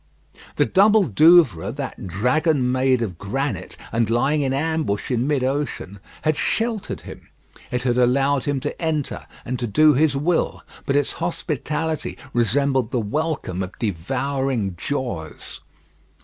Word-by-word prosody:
The - - +3
double 205 - +5
Douvres 150 - +4
that 135 -7 -6
dragon 125 - +1
made 130 -1 +2
of 90 -7 -5
granite, 120 - -3
and 115 -1 +1
lying 135 +6 +2
in 135 -2 0
ambush 145 -6 -1
in 125 +1 +1
mid 145 -3 +1
ocean 130 -7 -3 0.2
had 155 0 +2
sheltered 225 +5 -1
him. - - -11 0.4
It 125 0 -2
had 125 -1 +1
allowed 135 +2 +2
him 145 -2 0
to - - -5
enter, 155 -4 -2 0.2
and 125 0 -3
to 120 - -2
do 155 +8 +5
his 145 +1 +2
will; 160 +5 0 0.2
but 140 - +1
its 145 - +1
hospitality 160 -1 -3 0.2
resembled 130 +1 +2
the 125 - 0
welcome 115 - -2
of 95 0 -6
devouring 125 +2 -2
jaws. 85 - -5
135 Hz, 140 wpm, -22 LUFS, 120-150 Hz, 0.4 s, double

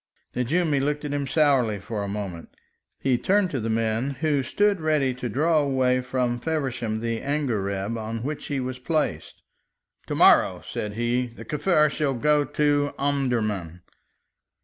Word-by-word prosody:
Nejoumi 145 +4 +1
looked 150 +1 -1
at 145 - -3
him 140 -1 -1
sourly 135 -8 +3
for 105 +2 -5
a 100 - -3
moment. 100 -4 -5 0.5
He 130 -3 +1
turned 195 -2 +2
to 135 - -1
the 115 0 -3
men 115 +3 0
who 150 -3 +2
stood 200 +7 +1
ready 150 -4 +1
to 125 -1 -5
draw 155 +7 +2
away 130 -3 +2
from 125 -1 -1
Feversham 130 -7 -2
the 115 -1 -2
angareb 110 -8 -1
on 110 +1 -4
which 150 +2 -4
he 140 -2 -2
was 130 0 -4
placed: 140 - -2 0.6
"To - - -2
morrow," - - +5
said 105 -1 -4
he, 120 +3 0
"the 120 - -12
Kaffir 150 -1 +2
shall 145 -4 -1
go 150 +4 +3
to 145 0 +1
Omdurman." 110 - -1
130 Hz, 155 wpm, -25 LUFS, 115-150 Hz, 0.6 s, morrow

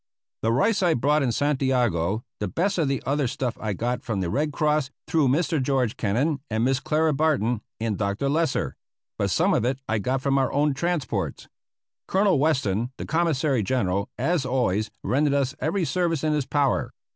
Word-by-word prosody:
The 115 - +1
rice 200 - +2
I 175 -3 +3
bought 145 +5 +2
in 130 -3 +1
Santiago; 120 - +1 0.2
the 105 - -1
best 185 - 0
of 155 - +2
the 135 -1 -1
other 140 -1 +1
stuff 125 0 -2
I 110 -2 -1
got 120 +5 -2
from 110 -4 -3
the 90 -3 -1
Red 150 - 0
Cross 150 -2 +1 0.2
through 160 -5 +2
Mr. 150 +2 +1
George 130 -4 0
Kennan 135 +9 0
and 110 0 0
Miss 130 +1 +2
Clara 155 +2 +1
Barton 135 -7 +1 0.2
and 110 -3 -2
Dr. 100 +6 -1
Lesser; 160 +3 0 0.4
but - - +1
some - - +2
of - - +2
it 125 +2 0
I 110 -1 0
got 130 +6 -1
from 135 -1 +2
our 135 - +1
own 145 0 +2
transports. 170 +1 -2 0.6
Colonel 195 -5 +3
Weston, 125 -7 +1
the - - -5
Commissary 155 -6 +1
General, 100 -3 0
as 170 -4 +1
always, 120 -5 0
rendered 140 +2 +2
us 140 -1 +1
every 170 +3 0
service 165 -3 0
in 155 -1 +2
his 150 -3 -1
power. 140 -3 +1
135 Hz, 185 wpm, -25 LUFS, 115-155 Hz, 0.6 s, I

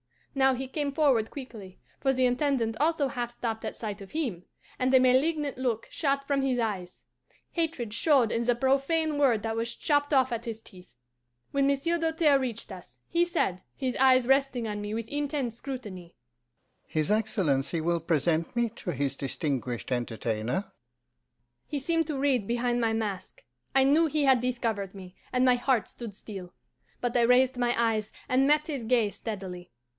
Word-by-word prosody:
"Now 265 -1 +3
he 265 +1 -4
came 285 +1 -2
forward 275 -8 +3
quickly, 220 -9 -9 0.2
for 270 - +2
the 260 -1 +2
Intendant 250 -3 +1
also 300 -2 +2
half 245 -3 -3
stopped 230 -2 -4
at - - -4
sight 210 -2 -5
of 195 - -11
him, 240 - -3 0.3
and 255 0 +2
a 260 - +8
malignant 280 +3 +2
look 240 -4 -1
shot 275 -2 0
from 275 -1 +1
his 265 -2 +1
eyes; 200 -6 -3 0.5
hatred 315 -10 -2
showed 255 -2 +3
in 230 - 0
the 245 0 +3
profane 285 +4 +1
word 245 -7 +3
that 225 0 -2
was 230 +1 -2
chopped 290 -1 +1
off 260 -2 +4
at 235 0 -3
his 225 -1 -5
teeth. 180 -7 -14 0.6
When 275 -1 +2
Monsieur 280 +5 +1
Doltaire 320 -3 +3
reached 235 -5 -4
us, 175 -10 -11
he 340 +1 +3
said, 260 - -1
his 260 -3 -2
eyes 260 -1 +5
resting 270 -3 +2
on 210 -1 -4
me 205 +1 -4
with 225 0 -4
intense 285 -3 -2
scrutiny, 210 -11 -7 0.7
'His 155 +4 0
Excellency 175 -9 +1
will 170 +1 +1
present 165 - 0
me 240 -1 +1
to 205 -5 -5
his 140 -1 -1
distinguished 135 -4 -3
entertainer?' 120 - -2 1.0
He 295 - -3
seemed 325 +3 0
to 300 -3 -2
read 265 -7 +1
behind 240 0 0
my 225 -1 +1
mask. 205 -4 -4 0.3
I 270 - +6
knew 300 +5 +4
he 300 0 0
had 265 -2 +5
discovered 230 -6 -2
me, 185 -1 -11 0.2
and 250 0 +3
my 250 -1 +5
heart 245 -3 +1
stood 230 -5 -8
still. 190 -4 -9 0.5
But 245 -1 -1
I 240 - +4
raised 250 +2 +4
my 245 -1 +1
eyes 220 -2 +1 0.2
and 260 +2 +3
met 300 +1 +3
his 280 -7 -4
gaze 225 -3 +2
steadily. 185 -5 -6
245 Hz, 175 wpm, -28 LUFS, 205-275 Hz, 1.0 s, a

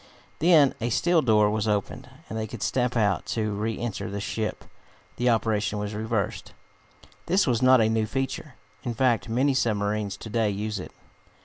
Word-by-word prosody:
Then 155 -5 +5
a 120 - 0
steel 175 +7 +3
door 105 -4 +3
was 110 0 -1
opened, 105 +3 -2 0.2
and - - -7
they 110 0 -2
could 110 -1 -6
step 125 -1 0
out. 100 -6 +1
To 110 -2 -1
re 110 +2 -2
enter 110 -3 -4
the 100 +1 -4
ship 110 +1 -3 0.5
the 125 0 +2
operation 110 -3 +1
was 105 +1 -4
reversed. 110 -1 -3 0.7
This 195 +2 +3
was 120 -3 +1
not 130 -1 +6
a 110 - +4
new 110 -1 0
feature. 135 +2 -4 0.3
In 120 -3 -3
fact, 120 -5 +1
many 130 +5 +2
submarines 105 -4 -1
to 110 - -9
day 110 -1 +1
use 105 +1 -3
it. - - -8
110 Hz, 180 wpm, -26 LUFS, 105-125 Hz, 0.7 s, not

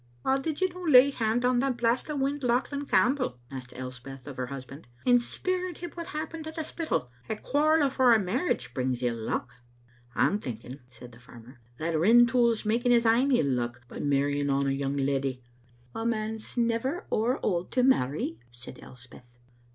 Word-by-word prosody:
" 120 - -32
How 270 +1 +2
did 310 +4 -4
you 375 - +3
no 365 +1 -10
lay 280 -5 +6
haud 235 -1 0
on 250 -1 +3
that 265 -1 0
blast 240 +4 0
o' 300 - -2
wind, 280 +1 -1
Lauchlan 265 +3 0
Campbell," 255 - +2
asked 130 -2 -8
Elspeth 130 +1 -8
of 145 -2 -8
her 125 -1 -3
husband, 135 +1 -9 0.2
"and 245 -1 +5
speir 370 +8 -2
at 345 - -9
him 345 -2 -7
what 340 -1 -7
had 340 - -6
happened 315 0 -6
at 315 - -7
the 320 - -3
Spittal? 310 - -3 0.2
A - - -1
quarrel 295 +6 +2
afore 260 -3 +4
a - - +3
marriage 225 - -1
brings 130 -2 -2
ill 120 -1 0
luck. - - -2 0.4
*' 120 0 -30
"I'm 205 - +2
thinking," 125 - -7
said 125 0 -12
the 115 - -16
farmer, 125 +1 -15 0.2
"that 160 +2 -2
Rintoul's 235 +3 +4
making 240 +3 +2
his 235 -1 +3
ain 240 +5 +4
ill 245 - +3
luck 120 -1 -3
by - - -9
marrying 145 0 +1
on 140 0 +1
a 135 - +1
young 135 +1 -2
leddy." 135 -2 -1 0.5
"A 225 - -4
man's 220 0 -3
never 235 +7 0
ower 240 +5 +1
auld 180 -2 -1
to 250 - +2
marry," 140 - +1
said 120 +1 -11
Elspeth. 125 -1 -15
220 Hz, 200 wpm, -28 LUFS, -, 0.5 s, lay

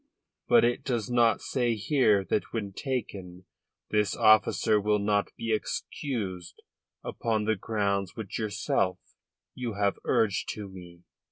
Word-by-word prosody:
But 240 - +6
it 120 - 0
does 120 -4 -2
not 120 -2 +3
say 120 -3 0
here 110 -4 +2
that - - -1
when 100 -4 -4
taken 95 -9 -5 0.5
this 105 -2 +1
officer 110 0 +4
will 105 +1 +2
not 100 0 +1
be 115 -1 -1
excused 105 -5 -4 0.5
upon 110 -2 -1
the 110 0 +2
grounds 100 -2 -1
which 110 -4 -5
yourself 100 -3 0 0.6
you 120 -3 -4
have 100 0 0
urged 105 -4 +1
to 105 -2 -6
me." 90 -2 -12
105 Hz, 135 wpm, -28 LUFS, 100-115 Hz, 0.6 s, But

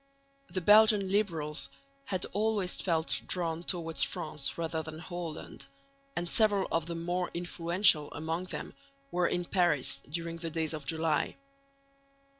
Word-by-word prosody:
The 185 - -2
Belgian 210 0 +6
liberals 165 -7 0 0.4
had 185 -2 -1
always 205 -3 0
felt 165 -3 +1
drawn 170 -2 -1
towards 170 -2 0
France 155 -5 +1
rather 165 -1 -2
than 160 0 -8
Holland, 175 -1 -7 0.5
and 175 - -2
several 205 0 +3
of 165 -1 0
the 170 - -4
more 175 +2 -2
influential 170 -2 +2
among 160 +4 -3
them - - -6 0.4
were 180 -1 +2
in 175 0 -1
Paris 170 -7 +2
during 165 +2 -3
the 165 0 -3
days 160 -1 -2
of 150 -3 -6
July. 160 0 0
170 Hz, 135 wpm, -31 LUFS, 160-185 Hz, 0.5 s, Belgian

